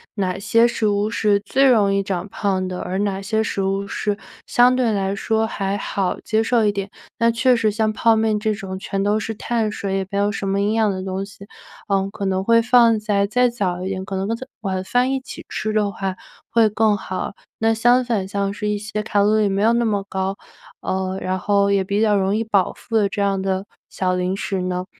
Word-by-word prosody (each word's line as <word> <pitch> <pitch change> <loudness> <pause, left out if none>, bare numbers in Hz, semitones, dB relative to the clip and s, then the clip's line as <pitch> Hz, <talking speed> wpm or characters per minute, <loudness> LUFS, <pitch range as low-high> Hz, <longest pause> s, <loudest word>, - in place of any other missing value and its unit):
哪 190 -3 -1
些 230 +3 +4
食 230 -2 -1
物 205 0 +1
是 210 -2 +2
最 265 +7 +2
容 205 -5 +4
易 195 - +2
长 190 -2 -3
胖 190 -2 -1
的， 185 -1 -5
而 185 +1 -3
哪 195 -1 -1
些 220 +3 0
食 200 - -2
物 195 +1 -1
是 205 +1 -2 0.3
相 245 +1 +4
对 250 -3 +2
来 195 -2 0
说 220 +2 0
还 200 -2 -2
好 195 -2 -2
接 220 0 +1
受 230 0 +2
一 205 - +3
点。 200 0 -4 0.3
那 230 0 +4
确 245 +2 +3
实 225 -2 +2
像 215 0 0
泡 230 +1 +3
面 220 -1 +1
这 215 0 0
种 190 -2 -6
全 195 0 -2
都 205 +2 +2
是 225 +1 -4
碳 225 0 -1
水， 195 -2 -2
也 190 -1 -3
没 200 - -3
有 205 +1 +2
什 195 - -4
么 195 +1 0
营 205 +2 +1
养 220 -1 +2
的 185 -1 -4
东 190 0 -3
西， 200 0 -13 0.4
呃， 195 -1 +1
可 200 -1 -5
能 190 0 0
会 230 +2 +5
放 235 -1 +4
在 205 -2 +1
再 245 +3 +3
早 185 -6 -2
一 190 - -3
点， 190 -1 -3
可 195 0 -5
能 190 +1 -2
跟 225 - 0 0.3
晚 190 -3 -2
饭 245 +6 +1
一 270 - 0
起 - - -10
吃 215 - -3
的 210 -2 +1
话 190 -1 -3 0.3
会 230 -2 +4
更 215 0 +2
好， 185 -1 -4 0.3
那 225 0 +3
相 240 +3 +4
反 220 -6 -1
像 200 0 -1
是 210 +1 -4
一 210 0 0
些 210 0 -4
卡 205 -1 +1
路 210 +2 +3
里 215 - +3
没 195 +1 0
有 225 +2 +4
那 235 0 +2
么 205 -3 0
高， 190 0 -2 0.5
呃， 190 0 -2
然 185 0 -1
后 200 +1 +2
也 200 -1 +2
比 200 +2 -1
较 215 -2 +3
容 195 0 +1
易 225 - 0
饱 205 -4 +1
腹 230 - -7
的 205 -2 +3
这 200 - -3
样 195 -1 +1
的 190 0 -1 0.2
小 185 -1 -1
零 180 +1 -1
食 195 -1 -3
呢， 180 0 -2
205 Hz, 255 characters per minute, -21 LUFS, 195-220 Hz, 0.5 s, 会